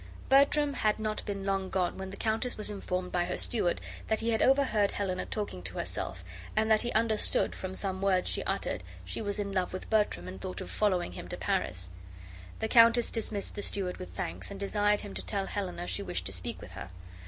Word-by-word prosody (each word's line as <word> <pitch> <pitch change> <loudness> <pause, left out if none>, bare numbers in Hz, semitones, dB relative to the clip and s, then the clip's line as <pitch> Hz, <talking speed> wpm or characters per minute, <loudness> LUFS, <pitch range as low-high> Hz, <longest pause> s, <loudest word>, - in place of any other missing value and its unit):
Bertram 280 +1 +5
had 215 -5 +2
not 215 -1 -2
been 200 -1 -3
long 195 -1 0
gone 185 -2 0
when 190 0 -5
the 195 - -8
countess 225 +3 0
was 210 0 0
informed 185 -2 -3
by 175 -1 +1
her 180 - -2
steward 200 -7 0 0.3
that 220 - +2
he 230 +1 +1
had 220 - +1
overheard 255 -7 +4
Helena 190 -2 -2
talking 205 - -3
to 90 0 -5
herself, 90 - -3 0.3
and 220 +1 +2
that 215 - +6
he 240 - 0
understood, 220 -1 +2
from 185 0 -5
some 190 -1 -2
words 190 -2 +3
she - - 0
uttered, - - -1 0.2
she - - -3
was 205 -1 0
in 200 -1 -2
love 185 -2 0
with 185 - -6
Bertram 205 - +2
and 95 0 -7
thought 90 0 -4
of 90 - -6
following 185 - +1
him 90 - -7
to - - -4
Paris. 90 0 -1 0.7
The 220 - +1
countess 230 0 +6
dismissed 215 -3 -2
the 205 - -4
steward 190 -3 0
with 185 - -7
thanks, - - -4
and 200 -1 -7
desired 205 +1 +2
him 205 -2 -7
to - - -3
tell 200 -2 -1
Helena 180 -4 -3
she 200 - 0
wished 180 - -2
to 95 - -4
speak 90 -1 -4
with - - -10
her. - - -7
200 Hz, 220 wpm, -31 LUFS, 185-220 Hz, 0.7 s, that